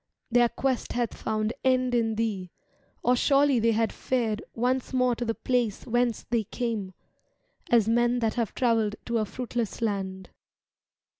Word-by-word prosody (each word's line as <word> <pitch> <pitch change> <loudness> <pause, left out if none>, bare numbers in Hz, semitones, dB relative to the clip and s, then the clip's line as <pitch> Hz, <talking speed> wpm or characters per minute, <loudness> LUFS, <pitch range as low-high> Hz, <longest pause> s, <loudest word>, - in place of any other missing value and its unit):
Their 240 0 +5
quest 265 0 -1
hath 240 -2 -1
found 215 +1 -2
end 255 -1 +2
in 225 -2 +1
thee. 210 -5 -2 0.5
Or 250 +1 +4
surely 275 0 +3
they 230 0 +3
had 225 0 +1
fared 230 -5 -1
Once 250 +3 0
more 250 -1 +3
to 240 - -3
the 225 -1 -1
place 245 -5 -1
whence 240 -1 0
they 230 -3 +1
came. 220 -5 -3 0.8
As 230 -3 +4
men 240 +1 +3
that 225 -3 0
have 230 -4 -2
travelled 225 -4 +2
to 235 -1 0
a 215 - 0
fruitless 240 -1 -4
land. 190 -4 -3
235 Hz, 155 wpm, -27 LUFS, 220-245 Hz, 0.8 s, Their